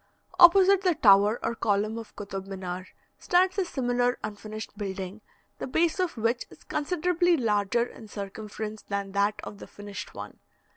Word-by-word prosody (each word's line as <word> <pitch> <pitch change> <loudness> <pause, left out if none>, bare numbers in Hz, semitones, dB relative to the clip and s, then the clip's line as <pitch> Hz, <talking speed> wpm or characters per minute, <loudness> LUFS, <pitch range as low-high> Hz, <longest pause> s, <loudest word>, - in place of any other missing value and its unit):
Opposite 380 +2 +7
the 365 -3 +2
tower 205 -1 +5
or - - 0
column 215 0 0
of 225 - -11
Kotab 195 -1 -6
Minar 185 -1 -6 0.3
stands 370 +2 +2
a 380 - +1
similar 245 -5 0
unfinished 215 +1 -7
building, 195 0 -5 0.4
the - - -4
base 325 +7 +1
of 360 -7 -1
which 230 +2 0
is - - -17
considerably 350 +2 +1
larger 215 -1 +1
in 225 -2 -12
circumference 210 +1 -6
than 200 -1 -4
that 200 +1 +1
of 205 - -8
the - - -10
finished 205 0 -9
one. - - -9
220 Hz, 155 wpm, -27 LUFS, 200-305 Hz, 0.4 s, Opposite